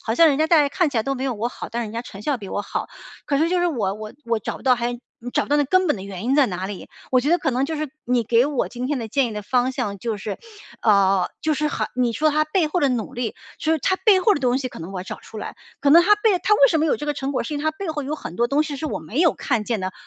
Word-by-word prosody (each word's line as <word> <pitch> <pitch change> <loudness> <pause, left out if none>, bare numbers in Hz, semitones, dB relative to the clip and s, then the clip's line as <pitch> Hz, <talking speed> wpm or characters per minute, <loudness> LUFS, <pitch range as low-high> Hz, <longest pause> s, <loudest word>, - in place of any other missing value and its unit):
好 225 - 0
像 335 - +7
人 280 - +2
家 315 - +3
在 305 -4 +5
看 310 +2 +1
起 255 - -4
来 225 - +2
都 275 - -1
没 260 - -5
有 255 -3 -1
我 225 +3 -2
好， - - -8
但 235 0 -2
是 225 - -4
人 210 - -8
家 230 +1 -3
成 205 -4 -10
效 285 +1 0
比 200 -4 -9
我 - - -2
好。 - - -4 0.4
可 280 - 0
是 320 +3 +2
就 360 0 +1
是 355 - +2
我 210 - -1
我 215 0 -8
我 230 -1 0
找 - - -5
不 - - -14
到 255 -1 +5
还 240 0 -2 0.3
找 - - +1
不 - - -14
到 290 - +3
那 290 - +4
根 370 +6 +3
本 300 - +2
的 190 - -8
原 195 +1 -7
因 260 +3 +2
在 285 -3 +5
哪 185 0 -4
里。 200 -1 -7 0.2
我 255 - +5
觉 280 - -1
得 350 - +4
可 275 - 0
能 255 +2 +1
就 315 +3 -3
是 305 0 -3 0.2
你 245 -1 +1
给 235 +3 +3
我 290 -4 -1
今 250 +1 -5
天 290 -2 0
的 230 - -4
建 265 +4 +1
议 230 - -5
的 210 0 -5
方 250 +3 +1
向 200 -6 -3
就 225 +1 -3
是 205 0 -5 0.4
呃， 195 -3 +4
就 315 -1 +1
是 300 +1 0
还 - - -2
你 245 -2 +1
说 310 +7 +2
他 305 +1 +2
背 315 +2 +1
后 330 +4 -1
的 285 - +3
努 240 -5 -2
力， 240 -2 -3 0.2
就 315 - -1
是 320 - +1
他 375 - +1
背 415 -5 +6
后 415 0 +4
的 - - -3
东 255 0 +2
西 260 - -3
可 - - -11
能 165 +3 -7
我 190 - -4
要 - - -7
找 - - -7
出 220 - -10
来。 - - -6 0.3
可 280 - +2
能 335 +4 +8
他 415 +4 +5
背 420 -2 +3
他 420 - +4
为 280 - +6
什 320 - +2
么 320 - +2
有 - - +2
这 295 - -6
个 295 - 0
成 270 0 -3
果， 260 - -1
是 300 - -4
因 290 - -2
为 - - -5
他 315 - +3
背 380 +3 -6
后 305 -2 -2
有 280 +3 -3
很 175 - -8
多 235 0 +1
东 290 +2 +2
西 295 -2 -5
是 310 +3 -4
我 - - -3
没 210 - -3
有 335 - +4
看 235 -6 -1
见 230 0 -1
的， 185 0 -3
260 Hz, 370 characters per minute, -22 LUFS, 225-305 Hz, 0.4 s, 能